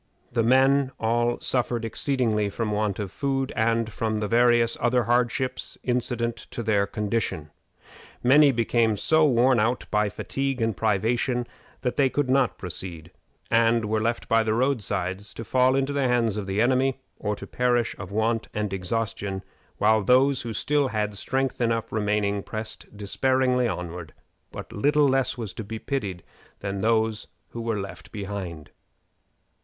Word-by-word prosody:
The 120 Hz, -1 st, +1 dB
men 130 Hz, +3 st, +4 dB
all 120 Hz, +1 st, +1 dB
suffered 120 Hz, -2 st, 0 dB
exceedingly 115 Hz, -4 st, 0 dB
from 110 Hz, +1 st, -3 dB
want 105 Hz, -2 st, 0 dB
of 100 Hz, -3 st, -4 dB
food, 135 Hz, +1 st, -1 dB
and 115 Hz, -1 st, +1 dB
from 110 Hz, -1 st, -1 dB
the 105 Hz, 0 st, -1 dB
various 120 Hz, 0 st, +3 dB
other 120 Hz, 0 st, +2 dB
hardships 125 Hz, +2 st, -1 dB
incident 120 Hz, -1 st, -1 dB
to 120 Hz, -, -5 dB
their 100 Hz, -2 st, +2 dB
condition. 105 Hz, -8 st, -2 dB, 0.7 s
Many 140 Hz, +3 st, +6 dB
became 115 Hz, -2 st, +1 dB
so 160 Hz, +8 st, +3 dB
worn 125 Hz, -1 st, +4 dB
out 115 Hz, +4 st, 0 dB
by 105 Hz, -1 st, +2 dB
fatigue 135 Hz, +5 st, -3 dB
and 115 Hz, -2 st, 0 dB
privation 115 Hz, +5 st, 0 dB, 0.4 s
that 125 Hz, -, -2 dB
they 135 Hz, -2 st, +4 dB
could 135 Hz, -1 st, 0 dB
not 135 Hz, -2 st, +2 dB
proceed, 85 Hz, -2 st, -6 dB, 0.4 s
and 115 Hz, 0 st, +3 dB
were 110 Hz, +1 st, 0 dB
left 115 Hz, +2 st, -1 dB
by 115 Hz, 0 st, +4 dB
the 110 Hz, -1 st, 0 dB
road 130 Hz, 0 st, +1 dB
sides 95 Hz, +1 st, -4 dB
to 115 Hz, -, -6 dB
fall 130 Hz, +2 st, +3 dB
into 135 Hz, +1 st, 0 dB
the 140 Hz, -2 st, +1 dB
hands 120 Hz, -4 st, +1 dB
of 105 Hz, -2 st, -4 dB
the 95 Hz, +2 st, 0 dB
enemy, 130 Hz, +2 st, +2 dB, 0.2 s
or 105 Hz, 0 st, -1 dB
to -, -, -9 dB
perish 120 Hz, -2 st, 0 dB
of 90 Hz, 0 st, -7 dB
want 110 Hz, +2 st, 0 dB
and 105 Hz, -2 st, -2 dB
exhaustion; 100 Hz, 0 st, -2 dB, 0.3 s
while 110 Hz, +1 st, +4 dB
those 130 Hz, +5 st, +4 dB
who 115 Hz, -, -5 dB
still 145 Hz, +5 st, +1 dB
had 105 Hz, -3 st, -2 dB
strength 130 Hz, +6 st, -2 dB
enough 115 Hz, -1 st, 0 dB
remaining 105 Hz, -1 st, 0 dB
pressed 110 Hz, +2 st, -6 dB
despairingly 125 Hz, +4 st, +1 dB
onward, 85 Hz, -6 st, -5 dB, 0.4 s
but -, -, -8 dB
little 145 Hz, +6 st, +3 dB
less 135 Hz, -1 st, +1 dB, 0.2 s
to 110 Hz, -, -6 dB
be 110 Hz, +2 st, -6 dB
pitied 105 Hz, -9 st, -4 dB, 0.4 s
than 100 Hz, -1 st, -3 dB
those 110 Hz, 0 st, +1 dB, 0.2 s
who 115 Hz, -, -6 dB
were 115 Hz, -2 st, -1 dB
left 95 Hz, -2 st, -8 dB
behind. 95 Hz, -6 st, -6 dB
115 Hz, 160 wpm, -25 LUFS, 105-125 Hz, 0.7 s, Many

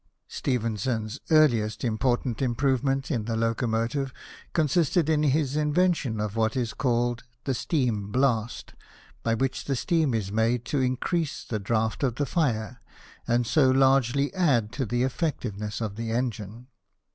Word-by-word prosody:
Stephenson's 115 Hz, -1 st, -2 dB
earliest 120 Hz, -9 st, +3 dB
important 120 Hz, +1 st, 0 dB
improvement 135 Hz, +2 st, 0 dB
in 115 Hz, -6 st, -1 dB
the 115 Hz, 0 st, -2 dB
locomotive 115 Hz, +4 st, 0 dB, 0.4 s
consisted 160 Hz, +1 st, +2 dB
in 150 Hz, -1 st, +2 dB
his 145 Hz, -1 st, +1 dB
invention 150 Hz, -6 st, +1 dB
of 105 Hz, 0 st, -3 dB
what 110 Hz, +1 st, +1 dB
is 125 Hz, 0 st, -1 dB
called 120 Hz, -3 st, 0 dB, 0.2 s
the 135 Hz, -, -1 dB
steam 120 Hz, -, -1 dB
blast, 125 Hz, -3 st, 0 dB, 0.5 s
by 115 Hz, 0 st, +1 dB
which 130 Hz, +2 st, -2 dB
the 140 Hz, -, 0 dB
steam 155 Hz, -2 st, +1 dB
is 100 Hz, -3 st, -2 dB
made 115 Hz, +3 st, +1 dB
to 145 Hz, -, 0 dB
increase 135 Hz, +5 st, -1 dB
the 110 Hz, -, -3 dB
draught 110 Hz, +1 st, -1 dB
of 125 Hz, -4 st, 0 dB
the 145 Hz, -, 0 dB
fire, 125 Hz, -7 st, -1 dB, 0.5 s
and 120 Hz, +1 st, +2 dB
so 130 Hz, +3 st, +4 dB
largely 135 Hz, +1 st, +3 dB
add 135 Hz, -, +2 dB
to 135 Hz, -1 st, -3 dB
the 120 Hz, +3 st, 0 dB
effectiveness 120 Hz, -, -2 dB
of 105 Hz, -2 st, -3 dB
the 115 Hz, 0 st, -3 dB
engine. 115 Hz, -1 st, -3 dB
125 Hz, 145 wpm, -26 LUFS, 110-140 Hz, 0.5 s, so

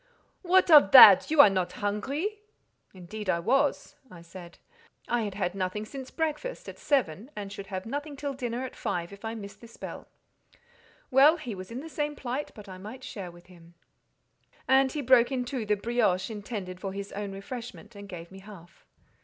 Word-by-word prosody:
"What 370 Hz, -1 st, +3 dB
of 295 Hz, -11 st, +8 dB
that? 205 Hz, -8 st, +10 dB
You 310 Hz, -2 st, +7 dB
are 245 Hz, -, +7 dB
not 185 Hz, -2 st, -1 dB
hungry?" 280 Hz, -, -3 dB, 0.5 s
"Indeed 190 Hz, +3 st, -8 dB
I 170 Hz, -, +2 dB
was," 275 Hz, +11 st, 0 dB
I 170 Hz, -2 st, -13 dB
said; 170 Hz, 0 st, -12 dB, 0.5 s
"I 240 Hz, -1 st, 0 dB
had 205 Hz, -3 st, -4 dB
had 185 Hz, -3 st, -2 dB
nothing 195 Hz, +2 st, -3 dB
since 265 Hz, +3 st, -9 dB
breakfast, 320 Hz, +10 st, -4 dB
at -, -, -9 dB
seven, 240 Hz, -, -1 dB
and 200 Hz, -1 st, -6 dB
should 200 Hz, -1 st, -8 dB
have 190 Hz, -1 st, -5 dB
nothing 290 Hz, +5 st, -5 dB
till 280 Hz, 0 st, -4 dB
dinner, 250 Hz, -1 st, -4 dB
at 255 Hz, -, -9 dB
five, 175 Hz, +2 st, -4 dB
if 200 Hz, -, -14 dB
I 225 Hz, 0 st, -4 dB
missed 200 Hz, -2 st, -10 dB
this 230 Hz, -1 st, -14 dB
bell." -, -, -8 dB, 1.0 s
"Well, 280 Hz, +5 st, +6 dB
he 245 Hz, -9 st, -6 dB
was 185 Hz, -1 st, -9 dB
in 240 Hz, +3 st, -6 dB
the 320 Hz, -, -9 dB
same 295 Hz, -1 st, -3 dB
plight, 265 Hz, +2 st, -4 dB
but 210 Hz, -1 st, -12 dB
I 185 Hz, -1 st, -10 dB
might 220 Hz, +7 st, -10 dB
share 195 Hz, -7 st, -7 dB
with 175 Hz, 0 st, -16 dB
him." 170 Hz, -2 st, -18 dB, 0.9 s
And 265 Hz, 0 st, +4 dB
he 295 Hz, -, -3 dB
broke 255 Hz, -1 st, +4 dB
in 255 Hz, -2 st, -2 dB
two 245 Hz, -4 st, -4 dB
the 210 Hz, -, +2 dB
"brioche" 215 Hz, -3 st, 0 dB
intended 205 Hz, -4 st, -6 dB
for 195 Hz, 0 st, -5 dB
his 200 Hz, 0 st, -6 dB
own 205 Hz, 0 st, -5 dB
refreshment, 225 Hz, +2 st, -9 dB
and 200 Hz, 0 st, -11 dB
gave 170 Hz, -2 st, -9 dB
me 190 Hz, -, -11 dB
half. 190 Hz, -4 st, -15 dB
215 Hz, 195 wpm, -28 LUFS, 190-265 Hz, 1.0 s, that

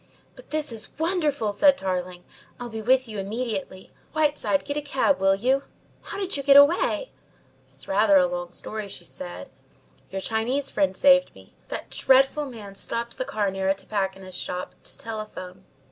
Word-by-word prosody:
"But, -, -, -15 dB
this 305 Hz, -3 st, -1 dB
is 225 Hz, -2 st, -7 dB
wonderful!" 305 Hz, -, 0 dB
said 285 Hz, +3 st, +5 dB
Tarling. 180 Hz, -1 st, -3 dB, 0.4 s
"I'll 245 Hz, -1 st, -5 dB
be 220 Hz, 0 st, -5 dB
with 255 Hz, +3 st, +3 dB
you 215 Hz, -2 st, -5 dB
immediately. 200 Hz, -2 st, -4 dB, 0.2 s
Whiteside, 300 Hz, -2 st, +1 dB
get 285 Hz, -, -3 dB
a 295 Hz, -, -1 dB
cab, 285 Hz, -2 st, +1 dB
will 195 Hz, 0 st, +4 dB
you? 260 Hz, +7 st, +2 dB, 0.4 s
How -, -, -7 dB
did 390 Hz, -2 st, -1 dB
you 280 Hz, -, -2 dB
get 280 Hz, 0 st, +7 dB
away?" 350 Hz, +12 st, +4 dB, 0.6 s
"It's -, -, -9 dB
rather 200 Hz, 0 st, +5 dB
a 180 Hz, -, +5 dB
long 175 Hz, 0 st, -4 dB
story," 215 Hz, +2 st, -5 dB
she -, -, -9 dB
said. 90 Hz, -9 st, -8 dB, 0.6 s
"Your 195 Hz, -, -4 dB
Chinese 245 Hz, +7 st, -1 dB
friend 190 Hz, -2 st, +1 dB
saved 275 Hz, -1 st, +5 dB
me. -, -, -17 dB
That -, -, -6 dB
dreadful 270 Hz, +3 st, +3 dB
man 215 Hz, -6 st, -9 dB
stopped 235 Hz, +4 st, -4 dB
the 255 Hz, -, -1 dB
cab 205 Hz, -4 st, -1 dB
near 190 Hz, 0 st, -1 dB
a 195 Hz, -, +3 dB
tobacconist's 190 Hz, -2 st, -3 dB
shop 180 Hz, 0 st, -5 dB
to -, -, -10 dB
telephone. 210 Hz, -4 st, -7 dB
220 Hz, 175 wpm, -25 LUFS, 195-275 Hz, 0.6 s, get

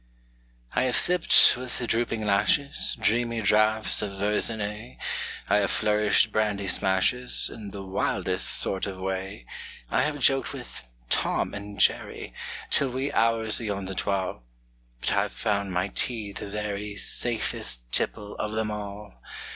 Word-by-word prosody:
I 125 Hz, -, +1 dB
have 125 Hz, -, 0 dB
sipped, 180 Hz, -1 st, +6 dB
with 125 Hz, 0 st, -4 dB
drooping 115 Hz, -1 st, -1 dB
lashes, 140 Hz, +10 st, +2 dB
Dreamy 115 Hz, +2 st, +1 dB
draughts 110 Hz, +1 st, +3 dB
of 100 Hz, -2 st, -4 dB
Verzenay; 105 Hz, -, 0 dB, 0.5 s
I -, -, +3 dB
have 100 Hz, -2 st, +1 dB
flourished 105 Hz, 0 st, +2 dB
brandy 105 Hz, -2 st, -1 dB
smashes 95 Hz, +8 st, +3 dB
In 105 Hz, -3 st, -9 dB
the 100 Hz, 0 st, -8 dB
wildest 95 Hz, 0 st, -2 dB
sort 95 Hz, 0 st, 0 dB
of 95 Hz, -2 st, -7 dB
way; 95 Hz, -8 st, -5 dB, 0.5 s
I -, -, +2 dB
have 150 Hz, -1 st, -1 dB
joked 135 Hz, -2 st, +2 dB
with -, -, -9 dB, 0.3 s
"Tom -, -, 0 dB
and 100 Hz, 0 st, -8 dB
Jerry" -, -, 0 dB, 0.4 s
Till 140 Hz, -, +3 dB
wee 130 Hz, +3 st, -3 dB
hours 115 Hz, -1 st, +2 dB
ayont 100 Hz, -3 st, -4 dB
the 95 Hz, -, -5 dB
twal' 95 Hz, -7 st, -2 dB, 0.6 s
But -, -, -1 dB
I've -, -, 0 dB
found 100 Hz, -2 st, -2 dB
my 90 Hz, +2 st, -1 dB
tea 110 Hz, -1 st, -1 dB
the 100 Hz, -, -7 dB
very 105 Hz, 0 st, -4 dB
Safest 110 Hz, -, +1 dB
tipple 105 Hz, 0 st, 0 dB
of 105 Hz, 0 st, -3 dB
them 110 Hz, -1 st, -2 dB
all! 105 Hz, -1 st, -8 dB
105 Hz, 140 wpm, -26 LUFS, 100-115 Hz, 0.6 s, sipped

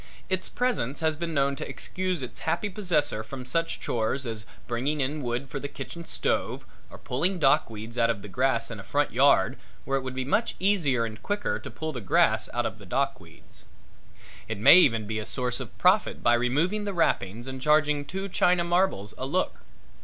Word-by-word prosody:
Its 185 Hz, -1 st, 0 dB
presence 240 Hz, -, -1 dB
has 160 Hz, -1 st, +2 dB
been 170 Hz, +1 st, -4 dB
known 140 Hz, -2 st, +1 dB
to -, -, -6 dB
excuse 185 Hz, -5 st, -3 dB
its 125 Hz, -, -7 dB
happy 170 Hz, +6 st, -1 dB
possessor 155 Hz, -, +1 dB
from 130 Hz, +3 st, -8 dB
such 165 Hz, +5 st, +1 dB
chores 120 Hz, +4 st, -1 dB
as 110 Hz, -3 st, -4 dB, 0.2 s
bringing 130 Hz, +5 st, -1 dB
in 145 Hz, +3 st, -1 dB
wood 125 Hz, +1 st, -3 dB
for 135 Hz, -, -5 dB
the 140 Hz, -, -4 dB
kitchen 140 Hz, +4 st, -8 dB
stove -, -, -1 dB, 0.2 s
or -, -, -11 dB
pulling 175 Hz, +10 st, -1 dB
dock 140 Hz, -7 st, +3 dB
weeds 115 Hz, +2 st, -7 dB
out 115 Hz, 0 st, +4 dB
of 105 Hz, -4 st, -2 dB
the -, -, -7 dB
grass 125 Hz, +3 st, 0 dB
in -, -, -6 dB
a -, -, -8 dB
front -, -, 0 dB
yard -, -, +4 dB, 0.3 s
where 135 Hz, 0 st, 0 dB
it -, -, -7 dB
would 130 Hz, -1 st, -6 dB
be 130 Hz, 0 st, -2 dB
much 210 Hz, -, 0 dB
easier 165 Hz, -, +2 dB
and 110 Hz, -1 st, -8 dB
quicker 205 Hz, 0 st, -2 dB
to -, -, -8 dB
pull 155 Hz, 0 st, -5 dB
the 125 Hz, -, -5 dB
grass 95 Hz, -, +2 dB
out -, -, -1 dB
of -, -, -4 dB
the -, -, -12 dB
dock -, -, 0 dB
weeds. -, -, -17 dB, 0.8 s
It 110 Hz, -, -4 dB
may 110 Hz, -, +8 dB
even 115 Hz, -11 st, +4 dB
be 110 Hz, +1 st, -3 dB
made -, -, -2 dB
a -, -, -7 dB
source 125 Hz, 0 st, -1 dB
of 130 Hz, -4 st, -8 dB
profit 190 Hz, +4 st, +2 dB
by 120 Hz, -, +5 dB
removing 150 Hz, -, +1 dB
the 200 Hz, -, -3 dB
wrappings 115 Hz, -, 0 dB
and 130 Hz, 0 st, -6 dB
charging 150 Hz, 0 st, +3 dB
two 190 Hz, +6 st, -5 dB
china 180 Hz, -2 st, +2 dB
marbles 170 Hz, -, 0 dB
a 130 Hz, -, -3 dB
look. 180 Hz, +7 st, -1 dB
140 Hz, 210 wpm, -27 LUFS, 120-170 Hz, 0.8 s, may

